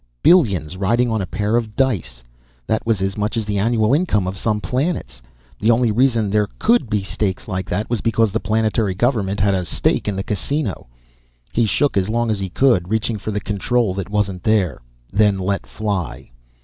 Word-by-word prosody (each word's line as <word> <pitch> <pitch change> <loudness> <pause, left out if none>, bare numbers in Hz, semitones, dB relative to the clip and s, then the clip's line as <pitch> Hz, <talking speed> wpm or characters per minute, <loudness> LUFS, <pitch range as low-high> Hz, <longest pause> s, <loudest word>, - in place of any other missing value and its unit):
Billions 100 - +3
riding 115 +5 +1
on 110 -2 0
a 95 - -4
pair 105 +4 -1
of 110 -3 -1
dice. 80 - -1 0.4
That 110 - 0
was 110 -5 +1
as 95 0 -1
much 105 +2 -2
as 110 - -1
the 105 -1 -1
annual 110 +2 +2
income 140 - +2
of 95 - -3
some 105 +2 -1
planets. 130 - -2 0.4
The 110 - +1
only 120 0 +3
reason 115 -3 +2
there 105 0 +2
could 230 - +2
be 105 -2 0
stakes 95 -1 -3
like 95 -3 -4
that 105 +5 -1
was 120 -2 -2
because 115 -2 +2
the 110 - 0
planetary 110 -3 0
government 105 -3 0
had 100 0 +3
a 95 -1 0
stake 85 - 0
in 105 - -1
the 95 - -2
Casino. 105 - -3 0.7
He 115 -1 +2
shook 140 +3 +1
as 95 +1 +1
long 115 0 0
as 105 - -1
he 95 -1 -3
could, 95 -4 +2
reaching 110 0 -1
for 100 - -5
the 105 -1 -1
control 105 +1 0
that 95 0 -5
wasn't 100 -3 -1
there 90 - +1 0.3
then 105 -1 +3
let 95 +1 -2
fly. 100 - -4
105 Hz, 200 wpm, -20 LUFS, 95-115 Hz, 0.7 s, Billions